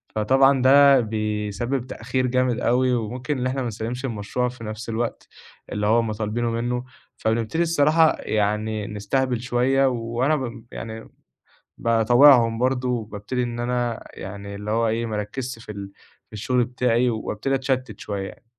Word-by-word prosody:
فطبعًا 135 +5 +4
ده 140 0 +7
بيسبِّب 110 +3 -2
تأخير 130 0 -2
جامد 125 -1 +1
أوي 125 +1 +2
وممكن 120 +4 -2
إن 125 - 0
إحنا 130 +1 -2
ما 125 - -2
نسلِّمش 115 +4 -4
المشروع 120 +2 -2
في 125 -1 -11
نَفْس 110 +1 -6
الوقت 115 +1 -3 0.4
اللي 105 0 -1
هم 115 0 +2
طالبينه 110 +2 -2
منّه، 120 +2 -2 0.3
فبنبتدي 115 +9 0
الصراحة 160 -1 +4
يعني 105 0 -1
نستهبل 120 +4 -1
شوية 125 +2 +2
وأنا 120 +4 0
ب 120 -5 -5
يعني 110 0 -7 0.7
باطاوعهم 115 +1 +5
برضه 125 +1 0
وبابتدي 115 +1 -3
إن 120 -1 -3
أنا 120 -1 -2
يعني 100 0 -8
اللي 105 +1 -6
هو 115 +1 +2
إيه، 115 +1 -1
ما 110 - -3
أركِّزش 120 +4 -4
في - - -7
ال 100 -1 -8 0.3
في - - -49
الشُغل 120 +4 0
بتاعي 125 0 +1
وابتدي 110 +3 -2
أتشتِّت 130 -1 -2
شوية. 100 +2 -6
120 Hz, 150 wpm, -23 LUFS, 110-130 Hz, 0.7 s, ده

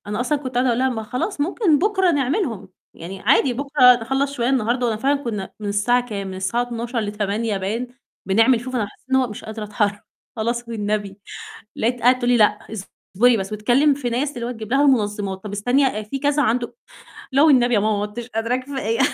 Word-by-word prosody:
أنا 210 +3 -3
أصلًا 290 +4 0
كنت 260 -3 -7
قاعدة 250 +1 +2
أقول 235 0 +1
لها: 260 0 +2
"ما 225 -3 -3
خلاص 250 - -3
ممكن 330 -1 +2
بكرة 380 -2 +2
نعملهم، 275 - -1 0.3
يعني 185 +3 -8
عادي 255 +3 +3
بكرة 265 -1 +5
نخلّص 270 +4 -1
شوية 240 -3 -1
النهارده"، 245 -1 +1
وأنا 225 -2 0
فعلًا 280 +4 0
كنا 210 -5 -4
من 205 - -4
الساعة 240 +5 +1
كام، 200 -3 -4
من 190 - -6
الساعة 190 +6 -1
12:00 240 0 -3
ل20:00 210 +1 -2
باين 220 +6 -3 0.4
بنعمل 225 +5 +4
شوف 255 +1 -5
أنا 215 -4 0
حسيت 205 - -19
إن 265 - +4
هو 265 - +4
أنا 245 - -3
مش 210 - -9
قادرة 220 0 -6
أتحر 205 0 -1 0.3
"خلاص 235 +2 -2
والنبي" 210 -3 -3 0.6
لقيتها 240 +2 -1
قاعدة 250 +2 +5
تقول 245 -1 0
لي: 245 - +4
"لأ، 210 -2 +3 0.5
اصبري 240 +4 +4
بس" 195 +1 -4
وتكلم 245 +8 +3
في 270 -3 -3
ناس 275 +4 -2
اللي 235 -1 -4
هو 245 - -3
تجبب 220 -2 -8
لها 275 - +4
المنظِمات، 205 -6 0
"طب 210 - -6
استني 245 +2 +1
في 275 +6 -5
كذا 290 +1 +1
عَنده 240 0 -1 0.6
لا 275 +2 +4
والنبي 250 -6 +5
يا 205 - +3
ماما 215 0 +1
ما 205 - -2
عُدتش 225 +3 -6
قادرة 230 +1 -1
كفاية." 255 -4 -3
240 Hz, 215 wpm, -21 LUFS, 210-260 Hz, 0.6 s, بكرة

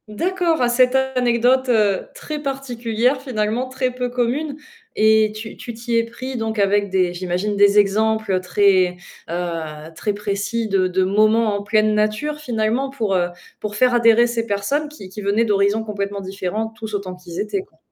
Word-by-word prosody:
D'accord, 335 - 0
à 240 - +3
cette 250 +1 +3
anecdote, 255 -1 +2
heu, 210 -5 +2
très 300 -1 -6
particulière, 250 -2 -1
finalement, 235 -1 -1
très 255 0 -1
peu 250 0 -2
commune 250 +5 -1 0.4
et 220 0 +4
tu 220 0 -7
tu 235 - -8
t'y 230 +1 -3
es 230 - +4
pris 255 +3 -7
donc 225 -1 -3
avec 200 0 +2
des 185 -2 +1
j'imagine, 185 +3 -2
des 200 0 +5
exemples, 210 -1 +2
très, 185 -1 +2 0.3
heu, 165 -2 -4
très 210 - -2
précis 205 +3 -2
de 195 -2 +2
de 185 +1 +1
moments 215 +2 +3
en 200 - -3
pleine 215 +1 +2
nature, 215 +9 0
finalement, 240 0 -1
pour, 225 -7 -2
heu, 175 -1 +1 0.3
pour 210 -1 -5
faire 250 +3 +3
adhérer 235 0 +5
ces 235 -1 -2
personnes 255 +10 -1
qui 290 -11 -11
qui 200 +3 -8
venaient 205 +3 +2
d'horizons 205 +1 +2
complètement 200 -2 -4
différents, 195 +3 -3
tous 220 -1 -7
autant 190 -2 -4
qu'ils 180 -2 -9
étaient, 375 - -1
quoi? 390 - -21
220 Hz, 175 wpm, -20 LUFS, 200-245 Hz, 0.4 s, des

